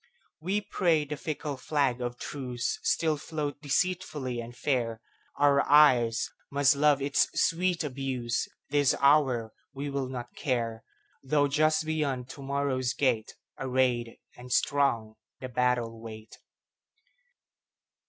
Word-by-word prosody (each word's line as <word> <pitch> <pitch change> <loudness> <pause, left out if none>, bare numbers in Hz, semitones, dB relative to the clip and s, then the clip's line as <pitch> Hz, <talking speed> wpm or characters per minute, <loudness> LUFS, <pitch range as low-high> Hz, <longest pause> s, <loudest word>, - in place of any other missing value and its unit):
We 190 +6 -1
pray 165 -7 +1
the 150 +1 -4
fickle 150 -2 -4
flag 130 -3 0
of 120 0 -3
truceStill 140 +4 -1
float 145 -2 -4
deceitfully 150 -5 -1
and 120 +1 -8
fair; 120 -6 -1 0.4
Our 140 -1 +4
eyes 125 -6 +5 0.2
must 140 0 +3
love 145 -1 +3
its 140 0 +2
sweet 175 0 +1
abuse; 130 -4 -2 0.2
This 145 -2 +3
hour 135 -6 +3 0.2
we 140 +1 -4
will 135 -2 -2
not 120 -2 -6
care, 115 -5 -2 0.4
Though 145 +1 +2
just 155 +2 +2
beyond 140 -5 -2
to 140 - -9
morrow's 135 -2 -1
gate, 115 -6 0 0.2
Arrayed 125 -3 0 0.2
and 125 0 -11
strong, 115 -8 +1 0.2
the 130 - -6
battle 120 -2 0
wait. 110 -1 -10
135 Hz, 120 wpm, -28 LUFS, 120-150 Hz, 0.4 s, eyes